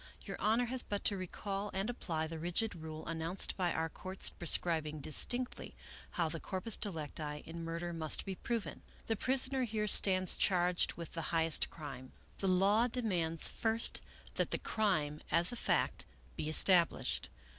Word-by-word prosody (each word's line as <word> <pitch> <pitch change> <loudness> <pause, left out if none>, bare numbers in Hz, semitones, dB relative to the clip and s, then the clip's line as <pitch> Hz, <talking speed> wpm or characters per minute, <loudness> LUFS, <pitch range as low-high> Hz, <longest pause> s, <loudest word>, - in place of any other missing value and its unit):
Your - - -7
Honor 225 +4 +2
has 250 +1 -1
but 205 -1 -4
to 205 - +3
recall 195 +2 -5
and 195 +2 -1
apply 170 -10 -3
the 160 0 -7
rigid 175 +7 -1
rule 160 -2 -8
announced 165 +3 0
by 180 -2 0
our 160 - -1
courts 185 +4 +1
prescribing 160 -3 0
distinctly 245 - +1 0.4
how 170 -2 +1
the 160 +1 -5
corpus 190 +6 +3
delicti 150 -5 -5
in 165 +1 -8
murder 170 +1 -5
must 160 -2 -1
be 195 - -4
proven. 230 +3 -4
" - - -26
The 225 - -1
prisoner 260 +3 +1
here 215 -2 -2
stands 185 -2 +5
charged 180 -2 +1
with 170 -2 -9
the 165 - -4
highest 165 -1 +1
crime. 130 -5 -10 0.3
The 195 - -2
law 200 +5 +3
demands, 180 -10 +3
first, 225 0 +1 0.4
that - - 0
the - - -1
crime, 155 -9 -1
as 170 +1 +4
a - - -5
fact, - - -1 0.3
be 155 - -4
established. 170 +1 +3
180 Hz, 165 wpm, -34 LUFS, 160-210 Hz, 0.4 s, stands